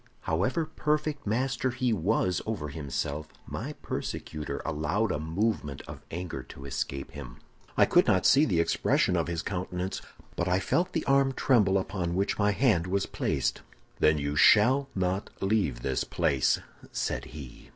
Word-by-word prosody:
"However 100 - 0
perfect 150 -3 -1
master 130 +3 0
he 125 -1 0
was 95 -1 +1
over 95 -10 -3
himself, 75 0 -3 0.2
my - - -5
persecutor 75 -1 -4
allowed 80 +8 0
a - - -1
movement 80 -3 -1
of - - -9
anger 85 +1 -5
to 70 - -12
escape 70 0 -4
him. 65 -4 -9 0.4
I - - +7
could - - +4
not 95 -1 +3
see 140 +3 +6
the 90 - +1
expression 85 - +2
of - - 0
his 85 -1 -2
countenance, 90 -1 -3 0.3
but 85 - -1
I 90 0 +3
felt 175 - 0
the - - -1
arm 135 0 +3
tremble 105 -9 +3
upon 90 -3 -2
which 100 +3 0
my 105 0 +4
hand 100 -6 +2
was 95 +1 0
placed. - - -1 0.4
"'Then 75 0 +4
you 70 0 -2
shall 130 - +5
not 95 +1 -1
leave 95 - 0
this 65 -2 0
place,' 75 -7 +1 0.3
said - - -2
he. 70 -6 -11
95 Hz, 160 wpm, -28 LUFS, 75-115 Hz, 0.4 s, I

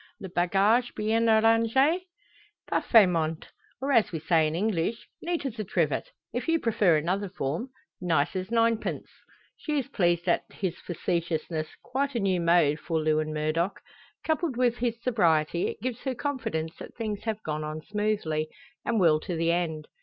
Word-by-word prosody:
"Le 190 - -6
bagage 195 +8 +2
bien 225 +2 +1
arrange?" 230 +10 +3 0.6
"Parfaitment; 165 -8 +3 0.3
or 275 +2 -1
as 230 -5 +4
we 165 - -2
say 160 0 +3
in 155 - -3
English, 210 +3 -1
neat 340 -3 -2
as 240 -4 -4
a - - 0
trivet. 165 -6 0 0.2
If 245 +6 -3
you 330 0 +3
prefer 205 - +3
another 185 +6 -1
form; 170 - -3 0.3
nice 165 -2 +1
as 185 +1 -3
ninepence." 230 -1 +1 0.5
She 300 -2 -2
is 275 -1 -2
pleased 175 - +1
at - - +2
his 185 -4 -3
facetiousness, 165 -2 -2 0.2
quite 275 +1 -2
a - - +1
new 190 -4 +1
mode 170 -3 +3
for 165 0 -1
Lewin 155 0 +1
Murdock. 155 +5 -1 0.5
Coupled 315 -4 0
with 245 -1 +2
his 235 -1 -1
sobriety, 170 -8 +2
it - - -6
gives 250 -2 -2
her 265 -2 -3
confidence 225 - -3
that - - -10
things 215 -3 -4
have 215 -1 -3
gone 155 0 -3
on 155 +1 -5
smoothly, 205 -7 -1 0.3
and 230 -2 0
will 160 -4 +5
to 175 +2 -4
the 165 +1 +1
end. 160 -3 -1
195 Hz, 165 wpm, -27 LUFS, 160-230 Hz, 0.6 s, will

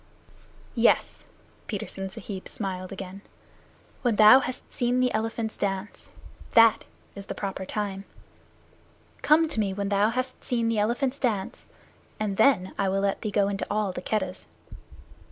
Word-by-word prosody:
"Yes." - - +2 0.4
Petersen 195 -2 -5
Sahib 195 -1 -7
smiled 185 -3 -4
again. 195 0 -7 0.8
"When 240 -4 +1
thou 215 +5 +9
hast 255 -1 -6
seen 245 +1 +1
the 250 -1 +2
elephants 220 0 -2
dance. 195 0 -3 0.4
That 230 -1 +6 0.3
is 200 -1 -9
the - - -5
proper 195 -1 -4
time. 200 -2 -3 1.2
Come 320 +2 +4
to 270 - -1
me 195 -3 0
when 200 0 -2
thou 205 +1 +3
hast 255 +2 -3
seen 235 -2 0
the 225 -2 +1
elephants 250 +6 0
dance, 215 -7 -2 0.5
and 205 -2 -2
then 220 -6 +3
I 195 -1 +2
will 195 +1 0
let 200 0 0
thee 215 - -2
go 200 -1 +2
into 200 0 -3
all 210 -2 0
the - - -6
Keddahs." 190 -3 -3
210 Hz, 150 wpm, -26 LUFS, 195-230 Hz, 1.2 s, thou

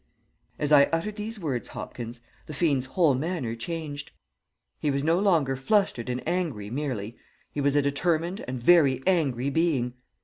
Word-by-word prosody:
"As 145 0 -1
I 140 -1 +8
uttered 165 +8 -2
these 215 +1 -5
words, 140 -9 -2
Hopkins, 120 0 -7 0.3
the 155 - -7
fiend's 140 -5 +1
whole 160 0 +3
manner 140 -3 -2
changed. 145 +2 -5 0.7
He 150 - 0
was 140 0 0
no 165 +3 +3
longer 165 -10 +2
flustered 135 - +1
and 125 0 -3
angry 145 - -2
merely; 120 -6 -3 0.3
he 145 - -3
was 140 0 +2
a 145 - +4
determined 165 +6 0
and 130 +1 -3
very 135 -2 +4
angry 140 -8 +1
being. 140 -6 +1
145 Hz, 160 wpm, -27 LUFS, 130-170 Hz, 0.7 s, I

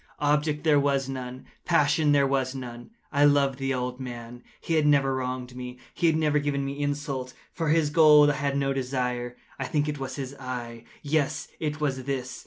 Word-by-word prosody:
Object 150 +1 +1
there 150 -3 +4
was 140 -1 +1
none. 130 -1 -6 0.2
Passion 150 -2 +3
there 140 -1 +4
was 135 -1 0
none. 120 -2 -8 0.2
I 145 -1 +3
loved 140 -2 +3
the 135 0 -1
old 125 -1 -2
man. 120 -1 -7 0.2
He 165 - -3
had 155 -2 +3
never 140 -2 +3
wronged 125 -1 -4
me. 125 0 -7 0.2
He 170 - +1
had 160 - +3
never 150 -2 +2
given 140 -1 -1
me 140 +1 -4
insult. 145 -3 -3 0.2
For 165 -2 -2
his 155 -1 +2
gold 150 -2 +7
I - - -3
had 140 -1 -1
no 135 0 +1
desire. 125 -2 -2 0.2
I 135 - -2
think 145 +3 0
it 150 -1 -3
was 135 -1 -5
his 135 -1 -5
eye! 120 -3 -6 0.2
yes, 145 -1 0
it 155 -1 -3
was 135 -4 -2
this! 130 -2 -3
140 Hz, 195 wpm, -26 LUFS, 130-145 Hz, 0.2 s, gold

